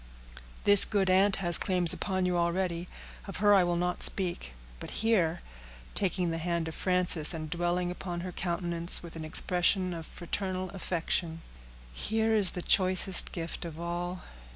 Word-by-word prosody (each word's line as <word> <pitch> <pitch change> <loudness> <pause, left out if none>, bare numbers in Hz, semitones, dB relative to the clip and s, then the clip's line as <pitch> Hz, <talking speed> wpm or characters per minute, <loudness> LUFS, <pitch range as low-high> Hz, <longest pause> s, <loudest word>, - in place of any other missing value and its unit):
"This 205 -1 +11
good 195 -3 -1
aunt 195 +2 +1
has 175 -3 +6
claims 180 -3 +2
upon 185 -2 -4
you 180 -1 -2
already; 170 0 -3 0.4
of 195 - -8
her 205 +1 +2
I 195 -2 +3
will 175 0 -2
not 180 +1 -4
speak; 175 - +6 0.3
but - - -10 0.2
here," 175 -7 -1 0.5
taking 180 -3 -3
the 165 - -5
hand 170 0 -4
of 160 - -8
Frances, 180 -4 0
and 155 -1 -9
dwelling 175 +1 -3
upon 175 -1 -8
her 185 +1 -8
countenance 170 -1 -1
with 170 -1 -13
an 160 - -9
expression 180 +3 0
of 165 -2 -10
fraternal 185 +1 -7
affection, 170 -3 -5 0.5
"here 220 - -3
is 200 -4 +2
the 175 - -6
choicest 185 0 +1
gift 165 -1 -8
of 165 -2 -10
all. 175 +1 -7
180 Hz, 160 wpm, -27 LUFS, 170-185 Hz, 0.5 s, This